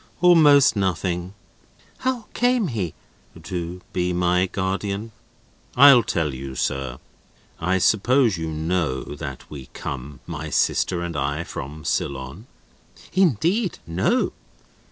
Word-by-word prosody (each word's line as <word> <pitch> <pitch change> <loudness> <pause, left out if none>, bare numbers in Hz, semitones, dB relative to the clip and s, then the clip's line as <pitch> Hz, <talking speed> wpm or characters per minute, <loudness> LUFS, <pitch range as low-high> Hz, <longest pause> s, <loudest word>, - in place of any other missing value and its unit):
"Almost 155 -8 +6
nothing!" 90 -1 -1 0.6
"How 255 -4 -2
came 245 -6 +2
he—" 100 - -3 0.5
"To 90 0 -5
be 90 0 0
my 90 +1 +2
guardian? 100 +3 -3 0.7
I'll 140 -2 +9
tell 80 -9 -1
you, 65 0 -7
sir. 65 -1 -2 0.6
I 90 +3 +1
suppose 115 +4 +3
you 80 -1 -4
know 80 -3 -1
that 70 -3 -7
we 70 -4 -8
come 70 +1 -6
(my 80 -2 -6
sister 85 +3 +1
and 85 -2 -5
I) 75 +3 -1
from 75 0 -8
Ceylon?" 70 - -3 0.7
"Indeed, 185 - +2
no." 85 +4 0
90 Hz, 115 wpm, -23 LUFS, 75-115 Hz, 0.7 s, I'll